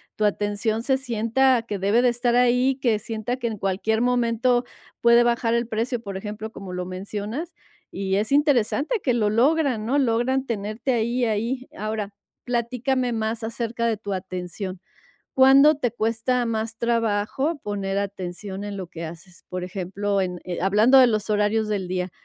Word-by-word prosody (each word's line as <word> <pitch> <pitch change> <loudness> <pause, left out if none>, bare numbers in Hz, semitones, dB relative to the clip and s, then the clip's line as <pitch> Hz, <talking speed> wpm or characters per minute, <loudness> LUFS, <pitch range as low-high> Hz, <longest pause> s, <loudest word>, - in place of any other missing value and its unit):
tu 215 - 0
atención 210 +2 0
se 265 +1 +2
sienta 240 +1 +2
que 205 -4 -4
debe 205 +5 +3
de 250 - +5
estar 240 0 +1
ahí, 250 +2 +3
que 230 -5 +1
sienta 225 +3 -4
que 240 - -2
en 220 -2 -4
cualquier 195 +3 0
momento 245 0 +2 0.4
puede 235 0 +6
bajar 235 -1 +1
el 235 -1 0
precio, 230 +2 -1
por 195 -3 -5
ejemplo, 210 +2 -6
como 195 -4 -9
lo 180 0 -4
mencionas, 205 - -5 0.4
y 190 0 -2
es 215 +5 -1
interesante 290 - +2
que 250 - +2
lo 215 -3 +2
logran, 260 -1 +2
¿no? 275 - +2
Logran 260 +1 +1
tenerte 225 +2 -2
ahí, 240 +2 0
ahí. 235 +4 -2
Ahora, 215 -1 -3 0.3
platícame 250 +1 -1
más 225 0 -2
acerca 235 +1 -2
de 225 - 0
tu 200 -1 -5
atención. 185 0 -5 0.6
¿Cuándo 275 +3 +7
te 255 -4 -1
cuesta 230 +2 0
más 225 0 -2
trabajo 230 +6 0
poner 200 -1 -2
atención 195 0 -5
en 205 -1 -5
lo 185 -2 -5
que 165 0 -8
haces? 170 +2 -10
Por 180 0 -4
ejemplo, 195 +2 -2
en 180 -1 -4
eh, 180 -1 -4
hablando 215 +7 +5
de 255 - +8
los 215 -2 -1
horarios 210 +1 +1
del 200 -3 -1
día, 180 0 -2
225 Hz, 170 wpm, -24 LUFS, 200-245 Hz, 0.6 s, de